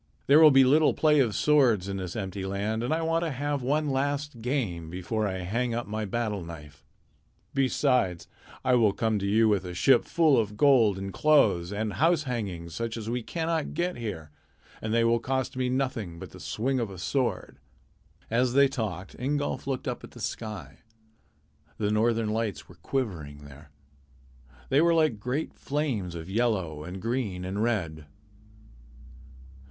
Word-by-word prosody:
There 145 +3 +6
will 160 -1 +9
be 135 -2 +6
little 150 +4 +4
play 150 -2 +4
of 120 -6 +2
swords 125 -11 +3
in 100 0 -3
this 90 -2 -5
empty 95 -2 -4
land, 100 +3 -2
and 120 - -2
I 165 +1 0
want 165 +1 +1
to 165 - -1
have 145 +1 -2
one 145 +3 0
last 140 -1 -2
game 110 - -2
before 100 +5 -2
I 95 -1 -3
hang 115 +6 -1
up 120 - -2
my 110 +1 -3
battle 105 -2 -2
knife. 75 -2 -11 0.7
Besides, 125 - +1 0.4
I 130 - +3
will 110 -5 +4
come 110 -1 0
to 100 - -2
you 110 +3 +4
with 100 -3 +2
a 90 -1 -7
ship 120 +8 +4
full 160 -6 +3
of 105 -2 -2
gold 115 -7 +5
and 95 0 -5
clothes 105 - +3
and 105 0 -2
house 165 +1 +2
hangings 95 - -4
such 115 0 -3
as 110 0 -4
we 125 +1 -1
cannot 165 +3 -2
get 175 +2 -1
here, 80 -10 -6 0.5
and 110 - -3
they 115 +1 +3
will 115 0 +3
cost 130 +2 -2
me 130 -1 -1
nothing 125 -9 -2
but - - -9
the - - -12
swing 130 +4 -1
of 115 -3 -2
a 95 - -9
sword." 125 +8 -2 0.7
As 120 +2 +1
they 140 +1 +6
talked, 105 -8 -5
Ingolf 145 +2 -2
looked 135 -2 -3
up - - -4
at - - -11
the - - -12
sky. 110 -3 -6 1.0
The 105 -1 0
northern 110 0 +1
lights 105 -8 -2
were - - -14
quivering 80 - -4
there. 70 +1 -14 1.0
They 140 +3 +4
were 170 0 +4
like 155 -10 +2
great 125 +8 -3
flames 130 - -2
of 80 0 -7
yellow 95 -8 -1
and 90 +4 -7
green 110 -5 -2
and 95 +3 -3
red. 85 -10 -2
115 Hz, 175 wpm, -27 LUFS, 95-135 Hz, 1.0 s, will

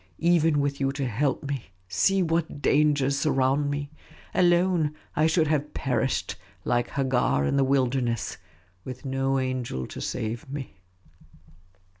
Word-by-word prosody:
Even 165 -3 +3
with 140 0 -1
you 135 -1 +1
to 135 -1 -2
help 130 +5 0
me, 140 -3 -4 0.2
see 185 - +2
what 165 -3 -1
dangers 140 -2 +2
surround 135 0 +2
me; 145 0 -3 0.4
alone, 175 -3 +3 0.2
I 155 +1 +3
should 160 0 +3
have 150 -1 -1
perished, 130 -1 -1 0.3
like 120 0 +1
Hagar 125 - +1
in - - +1
the 140 - +4
wilderness, 130 -4 0 0.5
with 130 +1 -8
no 135 0 0
angel 130 - -2
to - - -8
save 115 +1 -4
me." 135 -8 -7
140 Hz, 135 wpm, -26 LUFS, 130-150 Hz, 0.5 s, the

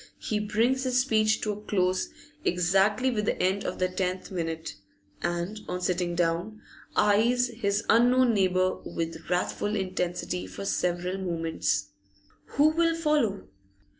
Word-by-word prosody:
He 215 - -2
brings 230 +5 +1
his 255 -1 +2
speech 220 -4 +2
to 215 - -1
a 210 0 -6
close 185 -3 0 0.3
exactly 195 +8 +2
with 210 -3 -1
the - - -1
end 190 +2 +1
of 180 - -3
the 185 - +1
tenth 185 +1 -3
minute, 165 - -3 0.5
and, 175 +5 -2
on 180 - -3
sitting 180 -1 -1
down, 175 +5 -1 0.4
eyes 235 +4 +3
his 210 -3 -1
unknown 245 +1 +5
neighbour 185 -2 +2
with 165 -1 -5
wrathful 185 +3 0
intensity 180 - -2
for 95 +1 -7
several 180 - -1
moments. 165 - -1 0.7
Who 295 +2 +6
will 330 +1 +2
follow? 300 - 0
190 Hz, 135 wpm, -27 LUFS, 175-220 Hz, 0.7 s, Who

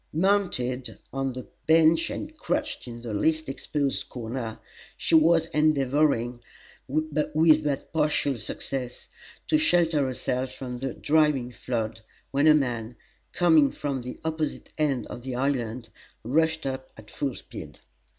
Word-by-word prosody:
Mounted 155 -9 0 0.2
on 135 -1 -1
the 130 0 -7 0.2
bench 160 +1 +5
and 310 0 -6
crouched 310 - -2
in 120 0 -8
the 115 -3 -4
least 155 +9 +1
exposed 140 +1 -2
corner, 115 -1 -5 0.4
she - - -2
was 165 +1 +6
endeavoring, 140 -5 +2 0.5
with 155 +3 -1 0.5
but 145 +1 -2
partial 150 -3 +2
success, 125 +3 -5 0.4
to 310 - +3
shelter 170 - +3
herself 130 0 -2
from 125 -1 -6
the 135 -1 -3
driving 150 -5 +2
flood, 115 -3 -3 0.3
when 140 +3 +3
a 155 - +8
man, 120 -5 -1 0.4
coming 160 -5 +5
from 140 -3 -3
the 125 +1 -7
opposite 160 -1 -2
end 140 -5 +1
of - - -8
the 130 0 -5
island, 125 -3 -1 0.3
rushed 160 +5 +1
up 130 -1 -4
at 110 0 -13
full 140 -4 -2
speed. - - -10
135 Hz, 135 wpm, -26 LUFS, 125-155 Hz, 0.5 s, a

